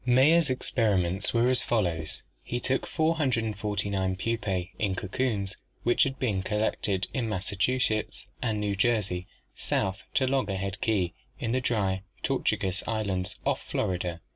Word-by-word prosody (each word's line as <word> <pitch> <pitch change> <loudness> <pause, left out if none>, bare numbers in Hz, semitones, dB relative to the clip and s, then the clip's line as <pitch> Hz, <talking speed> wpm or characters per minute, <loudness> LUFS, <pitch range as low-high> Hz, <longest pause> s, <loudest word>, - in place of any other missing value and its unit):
Mayer's 135 +6 +5
experiments 100 -7 +1
were 120 +1 +3
as 130 - +5
follows: 85 -8 0 0.2
He 120 - -2
took 130 +2 0
"449 105 - 0
pups 95 -4 -1
(in 100 -3 +1
cocoons) 100 0 -1 0.3
which 120 - +3
had 135 0 -3
been 110 -8 0
collected 100 -2 0
in 120 -4 -1
Massachusetts 110 +3 0 0.2
and 110 -4 0
New 100 -1 0
Jersey, 100 -5 +1 0.3
south 95 0 0
to 130 - +4
Loggerhead 100 -7 -1
Key 95 -5 +1 0.2
in 115 - -2
the 130 +1 +1
Dry 100 -6 +1 0.2
Tortugas 95 0 +1
Islands 100 -5 -1
off - - +1
Florida. 90 -2 -2
105 Hz, 130 wpm, -28 LUFS, 95-120 Hz, 0.3 s, Mayer's